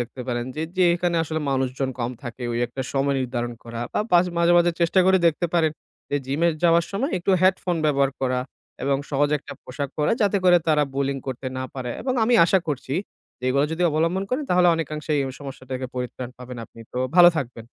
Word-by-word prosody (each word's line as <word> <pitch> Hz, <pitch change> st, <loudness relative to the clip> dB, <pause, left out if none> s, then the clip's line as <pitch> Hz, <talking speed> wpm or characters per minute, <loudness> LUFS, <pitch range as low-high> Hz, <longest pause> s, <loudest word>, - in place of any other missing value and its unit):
দেখতে 125 Hz, +2 st, -6 dB
পারেন 120 Hz, -1 st, -1 dB
যে, 155 Hz, -, -2 dB, 0.2 s
যেখানে 175 Hz, -1 st, +3 dB
আসলে 160 Hz, 0 st, -3 dB
মানুষজন 135 Hz, 0 st, -1 dB
কম 120 Hz, 0 st, -1 dB
থাকে 120 Hz, 0 st, -7 dB
ওই 120 Hz, -, -1 dB
একটা 135 Hz, -, -5 dB
সময় 140 Hz, 0 st, +1 dB
নির্ধারণ 120 Hz, -1 st, -3 dB
করা, 115 Hz, 0 st, -6 dB
বা -, -, +1 dB
পাস 175 Hz, +1 st, +6 dB
মাঝে, 170 Hz, 0 st, +4 dB
মাঝে 175 Hz, 0 st, +4 dB
চেষ্টা 170 Hz, +3 st, +4 dB
করে 190 Hz, 0 st, +5 dB
দেখতে 170 Hz, +2 st, +1 dB
পারেন 160 Hz, -2 st, +3 dB, 0.4 s
যে 145 Hz, -, +1 dB
gym-এ 155 Hz, +6 st, +1 dB, 0.2 s
যাওয়ার 170 Hz, 0 st, +5 dB
সময় 250 Hz, +10 st, -1 dB
একটু 175 Hz, -, -1 dB
headphone 185 Hz, -2 st, +2 dB
ব্যবহার 140 Hz, -2 st, +2 dB
করা, 130 Hz, -1 st, 0 dB, 0.4 s
এবং 135 Hz, 0 st, +2 dB
সহজ 145 Hz, +1 st, +2 dB
একটা -, -, -10 dB
পোশাক 140 Hz, +2 st, -4 dB
পরা 150 Hz, -, +2 dB
যাতে 205 Hz, 0 st, +2 dB
করে 180 Hz, -1 st, +7 dB
তারা 150 Hz, -1 st, +4 dB
Bullying 135 Hz, 0 st, -1 dB
করতে 130 Hz, 0 st, -5 dB
না 130 Hz, -, -3 dB
পারে। 125 Hz, -2 st, -4 dB
এবং 255 Hz, -1 st, -1 dB
আমি 240 Hz, +1 st, +3 dB
আশা 190 Hz, +2 st, +3 dB
করছি, 135 Hz, -1 st, -3 dB, 0.4 s
যে 125 Hz, -, -9 dB
এগুলা 140 Hz, +3 st, +2 dB
যদি 175 Hz, +2 st, -2 dB
অবলম্বন 165 Hz, +5 st, 0 dB
করেন 280 Hz, +4 st, -1 dB
তাহলে 180 Hz, 0 st, +5 dB
অনেকাংশে 155 Hz, -1 st, -4 dB
এই -, -, 0 dB, 0.2 s
সমস্যা 135 Hz, -2 st, -8 dB
থেকে 130 Hz, 0 st, -3 dB
পরিত্রাণ 125 Hz, 0 st, -5 dB
পাবেন 125 Hz, 0 st, -8 dB
আপনি। 115 Hz, -, -16 dB
তো 125 Hz, -, -3 dB, 0.2 s
ভালো 175 Hz, -1 st, +10 dB
থাকবেন। 120 Hz, -5 st, -5 dB
145 Hz, 205 wpm, -23 LUFS, 130-170 Hz, 0.4 s, ভালো